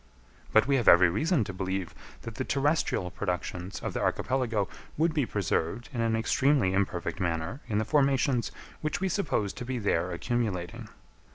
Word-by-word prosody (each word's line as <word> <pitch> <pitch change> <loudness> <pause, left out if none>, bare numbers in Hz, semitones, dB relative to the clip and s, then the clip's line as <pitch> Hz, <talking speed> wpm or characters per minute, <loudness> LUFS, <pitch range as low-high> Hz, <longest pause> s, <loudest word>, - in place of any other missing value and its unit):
But 110 0 +5
we 140 +1 +3
have 120 - -1
every 85 0 +7
reason 150 - +2
to 95 - -6
believe 95 -2 -3 0.3
that 115 - -6
the 130 - -3
terrestrial 140 - 0
productions 90 -1 -4
of - - -3
the - - -2
archipelago 120 -6 0 0.3
would 160 +1 +2
be 145 -6 +1
preserved 100 +2 -1
in 120 - -1
an 115 -1 +1
extremely 120 -2 +2
imperfect 95 -3 -1
manner 85 - -2
in 105 -3 -1
the 110 - +1
formations 135 -3 +2 0.3
which 150 -1 -1
we 190 - 0
suppose 145 - 0
to - - -7
be 130 +1 -3
there 90 -5 0
accumulating. 90 -3 -2
110 Hz, 170 wpm, -28 LUFS, 95-135 Hz, 0.3 s, every